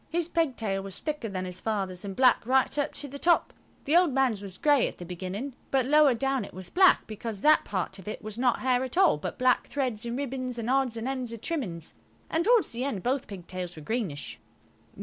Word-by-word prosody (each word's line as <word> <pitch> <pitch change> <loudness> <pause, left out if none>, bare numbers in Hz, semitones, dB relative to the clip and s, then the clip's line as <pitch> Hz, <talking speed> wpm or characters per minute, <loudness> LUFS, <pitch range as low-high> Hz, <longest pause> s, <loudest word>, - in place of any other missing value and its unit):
His 335 0 -1
pigtail 245 - -1
was 195 -1 -7
thicker 300 -7 -4
than 185 -1 -4
his 180 0 -5
father's 195 -4 -2
and 195 -1 -5
black 255 0 +4
right 265 +1 +3
up 285 - 0
to 290 - -2
the 280 +1 -9
top. 345 +2 +3 0.3
The 295 - +2
old 350 -3 +5
man's 255 -6 +1
was 190 -2 -7
grey 290 0 +3
at - - -8
the 175 - -8
beginning, 185 +9 -5 0.2
but 265 -2 +2
lower 295 -1 +5
down 270 +2 0
it - - -10
was 185 -1 -7
black, 370 +1 +5
because 215 -1 -5
that 310 +1 +6
part 190 0 -3
of 190 - -13
it 215 - -6
was 215 +1 -6
not 250 -1 +2
hair 255 0 +2
at 260 +5 -3
all, 380 - +5
but - - -5
black 255 0 +2
threads 255 -6 -2
and 235 +1 -3
ribbons 255 -2 -3
and 235 +1 -2
odds 265 -3 +1
and 225 +2 -4
ends 255 -3 -3
of 230 - -8
trimmings, 190 - -4 0.4
and 325 +2 +1
towards 470 -3 +4
the 240 +1 -2
end 260 -9 -3
both 260 +2 -1
pigtails 180 -2 -7
were 155 - -10
greenish. 195 -7 -3
245 Hz, 230 wpm, -28 LUFS, 195-275 Hz, 0.4 s, that